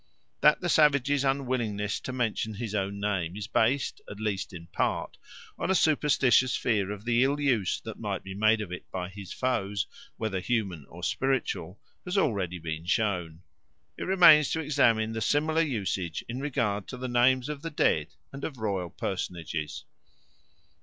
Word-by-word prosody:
That 150 0 +5
the 180 - -1
savage's 145 -3 +4
unwillingness 125 -7 -1
to - - -6
mention 115 -3 -1
his 110 0 -5
own 100 -1 -2
name 95 -4 -1
is 105 - -4
based, 120 +6 +1
at 100 - -8
least 105 -3 -2
in 85 -3 -9
part, - - -2 0.4
on - - -2
a 190 - +3
superstitious 135 -6 +3
fear 105 -5 0
of 105 +1 -6
the 120 +1 +3
ill 140 +2 +1
use 125 -10 +1
that - - -8
might - - -3
be 95 - -7
made 110 +2 +3
of 100 -4 -6
it 90 - -7
by 90 -1 -4
his 95 -1 -9
foes, 105 -6 -1 0.3
whether 110 -4 -2
human 95 - -2
or - - -12
spiritual, 125 -8 -1 0.2
has 180 +2 -2
already 100 - +1
been 80 -1 -5
shown. 90 -6 -1 0.5
It - - -5
remains 175 -6 +7
to 160 - 0
examine 120 -8 +2
the 115 0 -4
similar 155 +7 +2
usage 95 - -2
in 120 +2 -4
regard 110 -8 -1
to 125 - -7
the 130 +1 -4
names 125 +1 +3
of 150 -2 -5
the 165 - -4
dead 80 - +2 0.3
and 135 - -8
of 140 - -4
royal 100 -6 -2
personages. 85 -4 -4
110 Hz, 170 wpm, -28 LUFS, 95-135 Hz, 0.5 s, remains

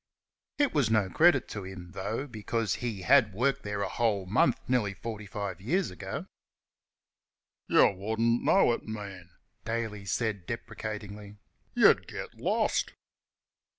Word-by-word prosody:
It 290 -2 +2
was 140 -7 +2
no 105 -4 +2
credit 160 -6 +4
to 105 - -5
him, 95 -2 -9
though, 110 +9 -3
because 115 -4 -2
he 110 -6 -3
had 115 -4 +4
worked 125 +4 +1
there 105 0 -3
a - - -1
whole 105 -5 0
month 115 +6 +3
nearly 115 -6 +1
forty 105 +1 -6
five 95 -3 -5
years 170 - 0
before. 90 - -6 1.4
"You - - +6
wouldn't 110 +4 0
know 195 -10 +4
it - - -3
now, 110 - -7
man," 95 -4 -9 0.3
Daly 110 -3 -3
said, 105 -1 -2
deprecatingly, 105 -2 -6 0.4
"you - - +8
'd - - -16
get - - -7
lost!" - - 0
110 Hz, 145 wpm, -29 LUFS, 100-115 Hz, 1.4 s, you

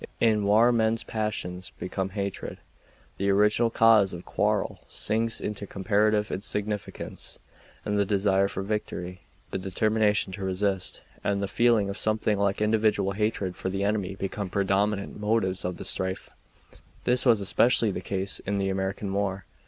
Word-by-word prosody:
In 110 -3 +3
war 110 +4 +5
men's 115 -1 +1
passions 100 -4 -3
become 95 +1 -3
heated, 100 -1 -4 0.6
the 100 +1 0
original 105 +4 +4
cause 110 -4 +5
of 85 0 -8
quarrel - - 0
sinks 115 +1 -1
into 105 -1 -4
comparative 105 +2 +1
insignificance, 105 +1 -4 0.5
and 105 0 0
the - - +4
desire 100 -1 +2
for 95 - -4
victory, 90 -3 -4 0.3
the - - -2
determination 105 +1 +1
to 100 0 -5
resist, 95 0 -1 0.2
and 100 0 0
a - - 0
feeling 115 -2 +3
of 100 - -4
something 110 -1 +1
like 100 +1 +1
individual 105 -2 +2
hatred 100 -3 -1
for 95 - -3
the 95 +1 -2
enemy 100 -2 -1
become 100 0 -4
predominant 100 +2 0
motives 105 -3 0
of 90 -1 -3
the - - -7
strife. 95 0 -3 0.7
This 125 0 +2
was 120 -5 +5
especially 110 +2 +3
the - - -4
case 95 0 -1
in 100 +1 -2
the 95 -1 0
American 95 +1 -2
war. 100 -2 -1
100 Hz, 150 wpm, -27 LUFS, 95-110 Hz, 0.7 s, war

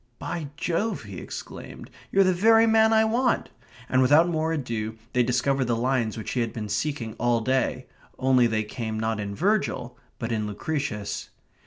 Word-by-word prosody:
"By 160 -4 -4
Jove!" 195 - -1
he 100 -4 -8
exclaimed. - - -9 0.2
"You're 195 - +5
the 185 -1 +3
very 225 +5 +5
man 220 0 +5
I 220 0 +5
want!" 240 +3 +1 0.4
and 130 - +3
without 150 +6 +5
more 160 -1 0
ado 115 -7 -3 0.2
they 125 - +3
discovered 125 +2 +1
the 120 -1 +1
lines 120 -2 0
which 110 - -5
he 125 - -1
had 115 -1 -1
been 105 -2 -5
seeking 115 +1 -2
all 120 0 +2
day; 130 +1 0 0.3
only 130 -2 +4
they 110 -1 0
come 110 0 -4
not 110 -1 -1
in 100 -1 -4
Virgil, 190 - 0 0.2
but 115 0 -4
in 110 -2 -1
Lucretius. 105 -1 -3
125 Hz, 175 wpm, -26 LUFS, 110-165 Hz, 0.4 s, You're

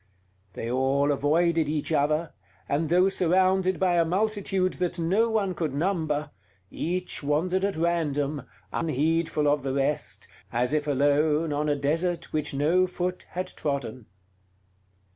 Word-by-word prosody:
They 115 +4 -4
all 135 +3 +2
avoided 160 +3 +2
each 155 +1 -2
other, 150 +2 +1 0.3
and 150 +2 0
though 180 +3 +4
surrounded 185 0 +2
by 180 -2 +2
a - - +5
multitude 190 0 0
that 180 0 -1
no 190 +8 +2
one 205 -4 0
could 155 -6 -3
number, 155 -3 -1 0.4
each 180 +2 -3
wandered 165 +6 0
at 200 0 0
random, 150 -5 -1 0.3
unheedful 160 0 0
of 145 0 +2
the 135 0 -3
rest, 140 +2 -2 0.2
as 125 +4 0
if 150 -1 0
alone 150 +2 +2
on 150 +1 0
a 145 - +2
desert 165 +4 -1
which 155 -1 -1
no 160 +7 +2
foot 180 0 -4
had 185 +1 -2
trodden. 130 -6 -4
160 Hz, 140 wpm, -26 LUFS, 145-180 Hz, 0.4 s, a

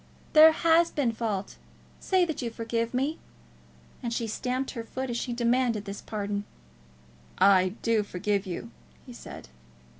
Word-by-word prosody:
"There 315 0 +9
has 335 +1 +3
been 270 -6 0
fault. 215 -4 -3 0.4
Say 370 -2 +2
that 315 -4 -4
you 240 - -2
forgive 230 0 -2
me." 275 +5 -1 0.8
And 235 - -3
she 235 0 -1
stamped 250 +4 -2
her 230 -3 -5
foot 260 +2 -5
as 235 - -2
she 240 - -3
demanded 235 -2 +1
his 200 -1 -6
pardon. 205 -1 -3 0.9
"I 185 0 +4
do 230 -2 +3
forgive 200 0 -2
you," 180 - -6 0.3
he - - -10
said. - - -10
230 Hz, 150 wpm, -27 LUFS, 205-260 Hz, 0.9 s, There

